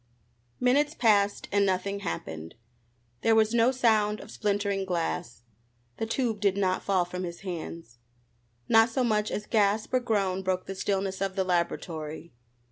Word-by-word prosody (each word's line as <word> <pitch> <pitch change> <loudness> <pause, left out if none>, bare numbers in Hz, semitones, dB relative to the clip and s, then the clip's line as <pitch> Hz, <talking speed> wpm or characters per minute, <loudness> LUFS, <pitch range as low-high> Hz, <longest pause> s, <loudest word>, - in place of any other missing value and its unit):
Minutes 285 +5 +2
passed 205 -5 +2
and 200 0 +3
nothing 200 +1 0
happened. 80 - -5 0.7
There 225 - +4
was 220 0 +3
no 235 +2 +4
sound 215 -5 +2
of - - -11
splintering 200 -2 -1
glass. 165 - -3 0.5
The 225 - -2
tube 230 -2 -1
did 200 -1 +1
not 185 -2 +1
fall 190 -3 +1
from 180 +1 -6
his 170 -1 -6
hands. 165 -8 -7 0.7
Not 225 +1 +5
so 250 +3 0
much 215 -3 +1
as 210 - -4
gasp 215 +1 +1
or 255 - +4
groan 200 -6 0
broke 185 -1 -1
the 195 - -5
stillness 195 0 -2
of 195 -1 -1
the 190 - +1
laboratory. 170 -3 -3
200 Hz, 155 wpm, -28 LUFS, 185-220 Hz, 0.7 s, Not